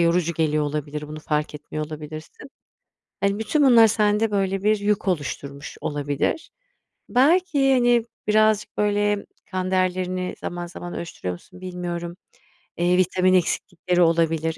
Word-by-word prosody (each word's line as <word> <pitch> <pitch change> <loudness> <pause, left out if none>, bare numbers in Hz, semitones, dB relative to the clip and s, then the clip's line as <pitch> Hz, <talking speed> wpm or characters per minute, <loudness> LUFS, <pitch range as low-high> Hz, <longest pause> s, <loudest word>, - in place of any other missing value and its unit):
yorucu 170 0 +2
geliyor 155 -2 +1
olabilir. 150 0 -4
Bunu 155 0 -7
fark 150 0 -2
etmiyor 150 +1 -5
olabilirsin. 155 - -9 0.7
Hani, 200 +1 +1
bütün 290 +7 +1
bunlar 235 -4 +7
sende 210 0 +2
böyle 195 -1 0
bir 215 0 +3
yük 205 -1 0
oluşturmuş 140 -4 -3
olabilir. 145 - -2 0.6
Belki, 285 0 +3
hani, 240 -2 +4 0.2
birazcık 215 0 +2
böyle 205 0 +1 0.3
kan 185 0 -2
değerlerini 185 0 0
zaman 175 0 -4
zaman 175 0 -8
ölçtürüyor 90 - -5
musun 180 - -14
bilmiyorum. 175 -1 -5 0.6
Eee, 175 +1 +2
vitamin 185 0 +3
eksiklikleri 180 0 +1
olabilir 165 -1 +2
180 Hz, 130 wpm, -23 LUFS, 160-210 Hz, 0.7 s, bunlar